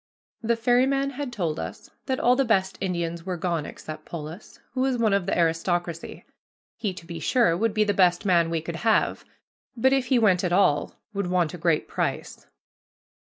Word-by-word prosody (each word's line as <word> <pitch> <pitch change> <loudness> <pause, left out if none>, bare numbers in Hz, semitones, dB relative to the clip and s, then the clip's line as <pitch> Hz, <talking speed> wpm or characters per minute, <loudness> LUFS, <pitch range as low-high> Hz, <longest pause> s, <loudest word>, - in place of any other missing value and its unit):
The 230 +1 +1
ferryman 260 +4 +2
had 280 -1 -5
told 170 -9 -2
us - - -7 0.2
that 260 -1 0
all 245 +1 +4
the 270 - +2
best 190 -5 +1
Indians 170 -3 -2
were 180 -1 -3
gone 170 -3 -2
except 155 - -9
Polis, 165 +4 -9
who 255 - -1
was 260 -1 +1
one 220 -3 +2
of 200 -3 +1
the - - 0
aristocracy. 170 0 -1 0.5
He, 215 -4 -2
to 175 -2 -11
be 170 -1 -7
sure, 175 - +3
would 220 +3 0
be 215 - +4
the 205 -1 +1
best 180 0 +3
man 170 -3 +3
we 165 -1 -1
could 165 +1 -5
have, 220 +4 +1 0.5
but 265 +3 +3
if 265 -2 +1
he 255 - +3
went 195 -6 +3
at 180 - 0
all 175 -6 +2 0.2
would 200 -2 -2
want 175 -2 +1
a - - -6
great 165 -2 +1
price. - - -3
185 Hz, 195 wpm, -25 LUFS, 170-230 Hz, 0.5 s, all